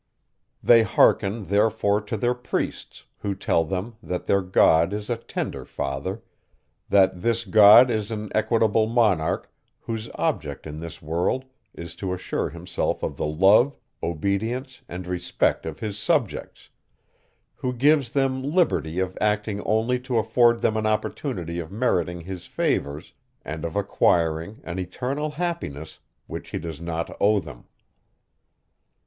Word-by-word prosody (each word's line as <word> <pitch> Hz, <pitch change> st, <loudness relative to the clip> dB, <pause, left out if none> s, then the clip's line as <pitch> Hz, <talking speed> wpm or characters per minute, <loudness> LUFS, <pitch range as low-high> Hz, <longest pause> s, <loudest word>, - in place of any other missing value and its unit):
They 115 Hz, -1 st, +7 dB
hearken 105 Hz, 0 st, +3 dB
therefore 105 Hz, +1 st, +2 dB
to 105 Hz, +1 st, -4 dB
their 120 Hz, +4 st, +1 dB
priests, 125 Hz, 0 st, -4 dB
who 100 Hz, -1 st, -2 dB
tell 85 Hz, -3 st, +1 dB
them, 95 Hz, +7 st, -4 dB
that 90 Hz, -4 st, -4 dB
their 100 Hz, -, +2 dB
God 90 Hz, -1 st, +4 dB
is 105 Hz, +2 st, -4 dB
a -, -, +2 dB
tender 115 Hz, -, -5 dB
father; 80 Hz, +11 st, -4 dB, 0.7 s
that 95 Hz, -2 st, +4 dB
this 115 Hz, +1 st, 0 dB
God 110 Hz, +5 st, +8 dB
is 110 Hz, -2 st, -1 dB
an 105 Hz, -2 st, -5 dB
equitable 110 Hz, -1 st, +2 dB
monarch 105 Hz, -9 st, +1 dB, 0.3 s
whose 115 Hz, 0 st, -5 dB
object -, -, -2 dB
in 75 Hz, 0 st, -7 dB
this 85 Hz, -1 st, -9 dB
world 85 Hz, +12 st, -1 dB, 0.3 s
is 85 Hz, 0 st, -8 dB
to 95 Hz, -1 st, -3 dB
assure 90 Hz, -, -3 dB
himself 85 Hz, +3 st, -3 dB
of -, -, -2 dB
the -, -, -2 dB
love, 100 Hz, -, +4 dB, 0.3 s
obedience 100 Hz, -, -2 dB
and 90 Hz, +1 st, -6 dB
respect 90 Hz, -1 st, -1 dB
of -, -, -7 dB
his 105 Hz, -1 st, -4 dB
subjects; 125 Hz, -, -1 dB, 0.9 s
who 125 Hz, -, -2 dB
gives 135 Hz, +1 st, +3 dB
them 135 Hz, 0 st, 0 dB
liberty 140 Hz, -, +1 dB
of 95 Hz, 0 st, -1 dB
acting 105 Hz, -1 st, 0 dB
only 115 Hz, +4 st, +1 dB
to 125 Hz, -1 st, -2 dB
afford 120 Hz, +1 st, +3 dB
them 110 Hz, -, +1 dB
an 110 Hz, 0 st, 0 dB
opportunity 105 Hz, -, -2 dB
of 80 Hz, 0 st, -6 dB
meriting 90 Hz, -6 st, 0 dB
his 90 Hz, +1 st, -8 dB
favours, 70 Hz, +1 st, -2 dB, 0.3 s
and 75 Hz, +1 st, -5 dB
of 85 Hz, -1 st, -4 dB
acquiring 85 Hz, -1 st, +1 dB
an 85 Hz, +2 st, -5 dB
eternal 130 Hz, -, -3 dB
happiness, 150 Hz, -, -4 dB, 0.3 s
which -, -, -7 dB
he -, -, -3 dB
does 80 Hz, -2 st, -6 dB
not 85 Hz, -1 st, -4 dB
owe 105 Hz, 0 st, +4 dB
them. -, -, -11 dB
100 Hz, 140 wpm, -24 LUFS, 85-115 Hz, 0.9 s, God